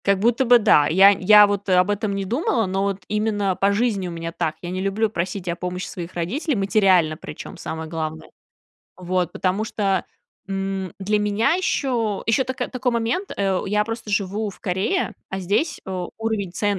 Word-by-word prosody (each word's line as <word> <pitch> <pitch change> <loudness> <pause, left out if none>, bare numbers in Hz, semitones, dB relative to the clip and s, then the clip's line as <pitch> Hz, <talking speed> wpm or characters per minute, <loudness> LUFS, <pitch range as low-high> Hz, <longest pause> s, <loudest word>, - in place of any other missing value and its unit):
Как 200 0 +3
будто 235 +5 +2
бы 245 0 +7
да, 150 -9 +4
я 195 +5 +7
я 205 +2 +7
вот 205 0 -2
об 180 +2 +4
этом 205 0 -1
не 195 0 -2
думала, 235 - 0
но 190 +1 -1
вот 200 -1 -2
именно 205 -2 0
по 195 +2 +2
жизни 205 -3 0
у - - -5
меня 165 0 -5
так. 165 -2 -2
Я 175 - -4
не 185 +1 -3
люблю 200 +3 0
просить 185 0 -3
о 170 - -1
помощи 180 +1 -4
своих 175 0 -7
родителей, 250 - -1
материально, 195 -6 +3
причём, 150 - -9
самое 160 0 -5
главное. 160 -1 -5 0.7
Вот, 180 -1 -1
потому 190 +3 -1
что, 195 -4 -1 0.4
м, 195 -1 -3
для 210 +2 0
меня 210 +6 +1
ещё 245 - -1
ещё 225 +4 +3
тако 260 +1 -3
такой 255 -1 -1
момент, 235 - -1
э, 195 -2 +1
я 210 +1 +1
просто 225 0 -6
живу 205 +1 -1
в - - -16
Корее, 190 - -1 0.2
а 190 - -3
здесь, 200 - -1
э, 185 -1 -3
уровень 220 -5 -2
цен 200 +1 0
200 Hz, 190 wpm, -22 LUFS, 185-220 Hz, 0.7 s, бы